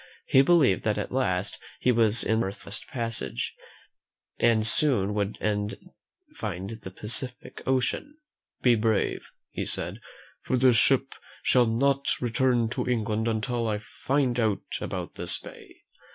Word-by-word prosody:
He 135 Hz, -, +5 dB
believed 140 Hz, -, +3 dB
that 105 Hz, -1 st, +1 dB
at -, -, -4 dB
last 100 Hz, -8 st, -1 dB, 0.2 s
he 125 Hz, -, +2 dB
was 115 Hz, -1 st, +3 dB
in 110 Hz, 0 st, +1 dB
the -, -, 0 dB
Northwest 100 Hz, +1 st, -5 dB
Passage, 115 Hz, -, -3 dB, 0.9 s
and 115 Hz, -2 st, +3 dB, 0.2 s
would 105 Hz, -7 st, 0 dB
soon 105 Hz, -1 st, -3 dB, 0.4 s
find 95 Hz, +3 st, -5 dB
the 110 Hz, -4 st, -8 dB
Pacific 120 Hz, +6 st, 0 dB
Ocean. 130 Hz, -, -1 dB, 0.5 s
"Be 125 Hz, -, +5 dB
brave," 110 Hz, -2 st, 0 dB, 0.2 s
he -, -, -4 dB
said, -, -, 0 dB, 0.4 s
"for 130 Hz, -, -1 dB
this 125 Hz, -1 st, +4 dB
ship 135 Hz, +3 st, +4 dB, 0.3 s
shall 125 Hz, -2 st, +4 dB
not 140 Hz, +4 st, +1 dB
return 120 Hz, 0 st, +1 dB
to 120 Hz, -, -3 dB
England 110 Hz, -2 st, -1 dB
until 115 Hz, +1 st, -1 dB
I 105 Hz, -1 st, 0 dB
find 125 Hz, +3 st, -1 dB
out 110 Hz, -3 st, 0 dB, 0.2 s
about -, -, -5 dB
this -, -, 0 dB
bay." -, -, -14 dB
115 Hz, 140 wpm, -26 LUFS, 105-130 Hz, 0.9 s, He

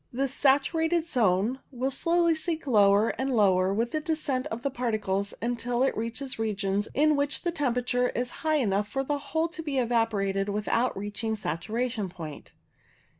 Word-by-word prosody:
This 270 Hz, +2 st, -1 dB
saturated 320 Hz, +5 st, +2 dB
zone 230 Hz, -, +1 dB
will 260 Hz, +1 st, -2 dB
slowly 335 Hz, +4 st, +2 dB
sink 320 Hz, 0 st, -2 dB
lower 205 Hz, -3 st, +4 dB
and 265 Hz, +1 st, 0 dB
lower 190 Hz, -6 st, +3 dB
with 230 Hz, +4 st, 0 dB
the 310 Hz, -, 0 dB
descent 300 Hz, -5 st, -1 dB
of 230 Hz, +2 st, -6 dB
the 280 Hz, -, 0 dB
particles, 210 Hz, -6 st, -1 dB
until 240 Hz, +1 st, 0 dB
it 270 Hz, -, +1 dB
reaches 230 Hz, +3 st, -4 dB
regions 205 Hz, -2 st, -1 dB
in 300 Hz, +2 st, +4 dB
which 285 Hz, 0 st, -1 dB
the 345 Hz, -, 0 dB
temperature 250 Hz, -5 st, 0 dB
is 245 Hz, 0 st, -2 dB
high 315 Hz, -1 st, +2 dB
enough 205 Hz, -7 st, +1 dB
for 270 Hz, +5 st, -2 dB
the 290 Hz, +1 st, -1 dB
whole 320 Hz, +4 st, -1 dB
to 335 Hz, 0 st, -6 dB
be 295 Hz, -4 st, -3 dB
evaporated 215 Hz, -5 st, +1 dB
without 210 Hz, +4 st, 0 dB
reaching 205 Hz, +2 st, -3 dB
saturation 215 Hz, +4 st, -2 dB
point. 160 Hz, -4 st, -9 dB
245 Hz, 165 wpm, -27 LUFS, 210-280 Hz, -, lower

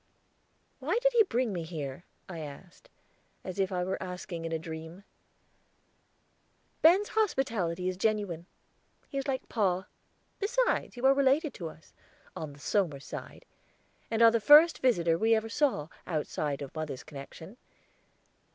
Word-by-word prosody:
"Why -, -, 0 dB
did -, -, +2 dB
he 475 Hz, -, +6 dB
bring 250 Hz, -, +1 dB
me 175 Hz, -, -3 dB
here?" 160 Hz, -2 st, -6 dB, 0.2 s
I 175 Hz, -3 st, -7 dB
asked, 165 Hz, -, -10 dB, 0.5 s
as 185 Hz, +1 st, -6 dB
if 190 Hz, 0 st, +1 dB
I 180 Hz, -1 st, -1 dB
were 190 Hz, +1 st, -3 dB
asking 180 Hz, -2 st, -6 dB
in 165 Hz, -, -4 dB
a 165 Hz, -, 0 dB
dream. 160 Hz, +3 st, -8 dB, 1.8 s
"Ben's 370 Hz, +6 st, +6 dB
hospitality 230 Hz, -, 0 dB
is 185 Hz, -1 st, -2 dB
genuine. 200 Hz, -5 st, -1 dB, 0.6 s
He 275 Hz, -, -2 dB
is 275 Hz, -, -4 dB
like 265 Hz, -1 st, -2 dB
pa. 190 Hz, -4 st, 0 dB, 0.5 s
Besides, -, -, 0 dB
you 245 Hz, -, -2 dB
are 270 Hz, -, +7 dB
related 280 Hz, +2 st, +2 dB
to 165 Hz, -3 st, -6 dB
us 155 Hz, 0 st, -17 dB, 0.4 s
on 155 Hz, -3 st, -6 dB
the 145 Hz, -, -16 dB
Somers 155 Hz, -5 st, -1 dB
side, -, -, -8 dB, 0.6 s
and 230 Hz, 0 st, +2 dB
are 230 Hz, -, +9 dB
the 230 Hz, -, +2 dB
first 300 Hz, +8 st, +8 dB
visitor 170 Hz, -10 st, +2 dB
we 225 Hz, +2 st, +4 dB
ever 220 Hz, 0 st, -1 dB
saw, 250 Hz, -, +1 dB, 0.2 s
outside 150 Hz, -3 st, -2 dB
of 135 Hz, -, -9 dB
mother's 155 Hz, -5 st, -5 dB
connection. 160 Hz, -, -10 dB
190 Hz, 150 wpm, -30 LUFS, 165-260 Hz, 1.8 s, are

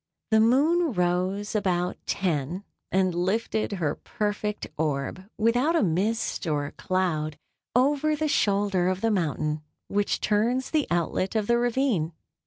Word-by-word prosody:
The 220 Hz, -, +5 dB
moon 290 Hz, +7 st, +3 dB
rose 185 Hz, +3 st, 0 dB
about 180 Hz, -4 st, 0 dB
ten, 170 Hz, 0 st, -1 dB, 0.3 s
and 185 Hz, -1 st, +2 dB
lifted 205 Hz, +5 st, 0 dB
her 160 Hz, -6 st, 0 dB
perfect 210 Hz, -1 st, -3 dB
orb, 155 Hz, +4 st, -2 dB
without 245 Hz, +9 st, +2 dB
a 330 Hz, -, +3 dB
mist 200 Hz, +3 st, 0 dB
or 145 Hz, -2 st, 0 dB
a 145 Hz, -, -6 dB
cloud, 160 Hz, -5 st, -1 dB, 0.4 s
over 290 Hz, +4 st, +3 dB
the 310 Hz, +1 st, -1 dB
shoulder 200 Hz, -8 st, +2 dB
of 185 Hz, 0 st, -1 dB
the 225 Hz, -, +2 dB
mountain 155 Hz, -5 st, -1 dB, 0.3 s
which 205 Hz, 0 st, 0 dB
turns 235 Hz, +5 st, +1 dB
the 305 Hz, -3 st, +1 dB
outlet 175 Hz, +3 st, 0 dB
of 215 Hz, -2 st, +1 dB
the 235 Hz, +2 st, +3 dB
ravine. 240 Hz, -, +1 dB
200 Hz, 140 wpm, -26 LUFS, 175-230 Hz, 0.4 s, The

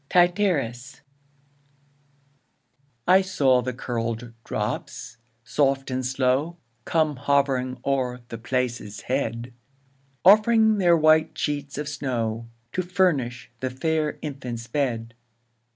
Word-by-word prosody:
Tityrus. 170 Hz, -, +1 dB, 2.1 s
I 185 Hz, +2 st, +7 dB
saw 140 Hz, -10 st, +2 dB
the 130 Hz, +1 st, -3 dB
curl'd 115 Hz, -1 st, -4 dB
drops, 115 Hz, -, -4 dB, 0.3 s
soft 135 Hz, +2 st, 0 dB
and 130 Hz, 0 st, -1 dB
slow 130 Hz, +6 st, 0 dB, 0.3 s
Come 155 Hz, -4 st, +1 dB
hovering 130 Hz, -2 st, +1 dB
o'er 125 Hz, -2 st, 0 dB
the 115 Hz, -, -6 dB
place's 120 Hz, -4 st, -2 dB
head, 120 Hz, -2 st, -2 dB, 0.7 s
Offring 215 Hz, +2 st, +6 dB
their 175 Hz, -3 st, +5 dB
whitest 155 Hz, 0 st, +4 dB
sheets 145 Hz, -2 st, -3 dB
of 150 Hz, 0 st, -3 dB
snow, 120 Hz, -6 st, -3 dB, 0.2 s
To 185 Hz, -, -1 dB
furnish 165 Hz, -10 st, 0 dB
the 130 Hz, -, -2 dB
fair 155 Hz, +4 st, -1 dB
infant's 125 Hz, -5 st, -5 dB
bed. 115 Hz, -3 st, -2 dB
135 Hz, 105 wpm, -25 LUFS, 125-155 Hz, 2.1 s, I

